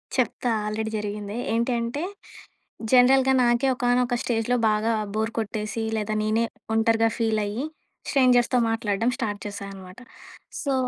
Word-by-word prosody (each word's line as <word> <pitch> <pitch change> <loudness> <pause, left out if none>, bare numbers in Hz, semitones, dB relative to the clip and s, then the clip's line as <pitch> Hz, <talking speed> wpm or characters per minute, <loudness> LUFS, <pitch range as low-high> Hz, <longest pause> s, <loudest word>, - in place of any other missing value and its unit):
చెప్తా 245 -1 0 0.2
ఆల్రెడీ 220 +1 -3
జరిగిందే. 210 0 -5 0.2
ఏంటి 235 +2 +1
అంటే 235 +7 -3 0.9
జనరల్‌గా 265 +1 +6
నాకే 240 +2 +2
ఒకానొక 245 0 +1
స్టేజ్‌లో 240 +1 0
బాగా 215 +2 +1 0.2
బోర్ 220 +1 0
కొట్టేసి 215 +1 -3
లేదా 215 0 -2
నేనే 220 +2 +1 0.3
ఒంటరిగా 225 0 +3
ఫీల్ 220 -2 +1
అయ్యి 220 +7 -3 0.4
స్ట్రేంజర్స్‌తో 250 -2 +4
మాట్లాడడం 225 0 0
స్టార్ట్ 210 -6 -3
చేశా 200 -1 -6
అన్నమాట. 185 +2 -12 0.6
సో 280 - 0
225 Hz, 125 wpm, -25 LUFS, 215-245 Hz, 0.9 s, జనరల్‌గా